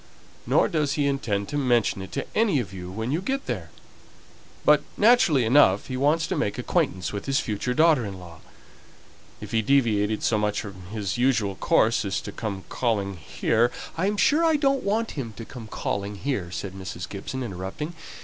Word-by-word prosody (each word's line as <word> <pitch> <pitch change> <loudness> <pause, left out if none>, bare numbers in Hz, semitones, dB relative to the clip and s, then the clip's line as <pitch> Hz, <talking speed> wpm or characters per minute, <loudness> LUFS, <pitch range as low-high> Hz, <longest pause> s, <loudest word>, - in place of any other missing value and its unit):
Nor - - +4
does 150 -5 0
he 145 -1 0
intend 115 -8 -1
to 145 - -2
mention 120 -7 +2
it 95 0 -8
to - - -2
any 210 -10 +3
of 100 -6 -5
you 90 -1 -7
when 110 +6 -3
you 160 +5 0
go 270 +7 0
there; - - -4 1.0
but, - - +6 0.2
naturally 205 - +5
enough, 110 -5 +4
he 130 - -3
wants 150 +5 +2
to 190 - -2
make 105 -10 -1
acquaintance 90 +1 -1
with 100 - -5
his 135 -1 +2
future 115 +4 -2
daughter 155 -4 +4
in 100 -3 -6
law. 85 -2 -12 1.0
If - - -8
he 110 - +2
deviated 110 -4 +2
so 110 - +2
much 105 0 0
from 95 -4 -9
his 105 0 -3
usual 115 -6 +2
course 110 +4 +2
as 100 -1 -1
to 100 - -7
come 100 -3 -5
calling 100 -5 -1
here 110 +8 +1 0.2
" - - -15
"I 185 +4 0
am 205 0 -1
sure 300 +9 +4
I 325 -1 +4
don't 275 -2 +2
want 220 +3 0
him 120 -7 -5
to 115 +3 -8
come 115 -2 -9
calling 100 -1 -3
here," 100 -5 -2
said 90 +3 -5
Mrs. 95 -2 -6
Gibson, 130 +6 -5
interrupting. 100 - -5
115 Hz, 195 wpm, -25 LUFS, 100-145 Hz, 1.0 s, but